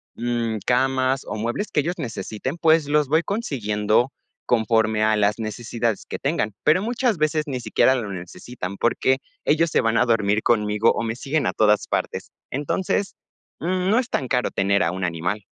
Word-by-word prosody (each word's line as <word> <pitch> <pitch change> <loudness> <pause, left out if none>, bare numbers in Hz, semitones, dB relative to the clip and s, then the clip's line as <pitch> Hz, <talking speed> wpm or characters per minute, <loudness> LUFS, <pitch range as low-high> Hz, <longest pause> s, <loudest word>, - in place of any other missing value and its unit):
mm, 120 -2 -1
camas 130 +1 +2
o - - -4
muebles 120 - -2
que 150 - +2
ellos 175 +4 -3
necesiten, 115 - -4
pues 160 -2 +4
los 150 -1 +2
voy 160 +2 +4
consiguiendo 120 - 0 0.4
conforme 110 -2 +2
a 110 0 +3
las 105 0 +2
necesidades 115 0 -3
que - - -4
tengan. 105 -1 -1
Pero 160 +5 +4
muchas 240 -1 0
veces 155 0 +1
ni 130 -3 -3
siquiera 130 +2 +3
lo 115 -6 -3
necesitan, 90 +2 -7
porque 130 +2 +2 0.3
ellos 160 +2 +3
se - - +2
van 115 0 +1
a 125 - +4
dormir 110 -2 +2
conmigo 105 -1 +2
o - - -2
me 115 0 -2
siguen 145 +4 -1
a - - 0
todas 105 -1 +3
partes. - - -3 0.2
Entonces, 185 +8 -1 0.4
mm, 180 +2 -1
no 225 +4 +4
es 255 - -3
tan 130 - -1
caro 125 -1 +1
tener 100 +1 +1
a 85 - +1
un 95 +1 -4
animal. 90 +4 -2
120 Hz, 180 wpm, -23 LUFS, 105-150 Hz, 0.4 s, pues